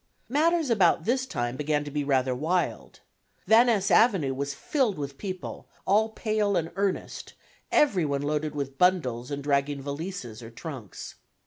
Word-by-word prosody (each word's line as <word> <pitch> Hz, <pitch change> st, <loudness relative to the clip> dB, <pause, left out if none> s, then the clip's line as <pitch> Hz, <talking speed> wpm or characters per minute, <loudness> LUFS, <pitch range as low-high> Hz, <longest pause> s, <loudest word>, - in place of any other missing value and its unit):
Matters 315 Hz, +1 st, +2 dB
about 180 Hz, -7 st, +4 dB
this 260 Hz, +2 st, +1 dB
time 120 Hz, -, -2 dB
began 150 Hz, +1 st, 0 dB
to 145 Hz, -, -7 dB
be 145 Hz, 0 st, -1 dB
rather 130 Hz, -2 st, +1 dB
wild. 165 Hz, +8 st, -2 dB, 0.4 s
Van 230 Hz, +3 st, +6 dB
Ness 205 Hz, -5 st, +2 dB
Avenue 190 Hz, -, +4 dB
was 140 Hz, +1 st, -3 dB
filled 255 Hz, -, 0 dB
with 140 Hz, -1 st, -5 dB
people, 185 Hz, -3 st, -6 dB, 0.2 s
all 215 Hz, +3 st, +3 dB
pale 215 Hz, -3 st, 0 dB
and 165 Hz, -1 st, -2 dB
earnest, 200 Hz, -1 st, -3 dB, 0.4 s
every 205 Hz, -, +3 dB
one 140 Hz, -2 st, -1 dB
loaded 150 Hz, +1 st, -1 dB
with 135 Hz, -1 st, -4 dB
bundles 130 Hz, -10 st, +2 dB
and 140 Hz, -1 st, -4 dB
dragging 140 Hz, 0 st, 0 dB
valises 140 Hz, -, -6 dB
or 115 Hz, -, -9 dB
trunks. 120 Hz, -, -8 dB
155 Hz, 155 wpm, -27 LUFS, 140-205 Hz, 0.4 s, Van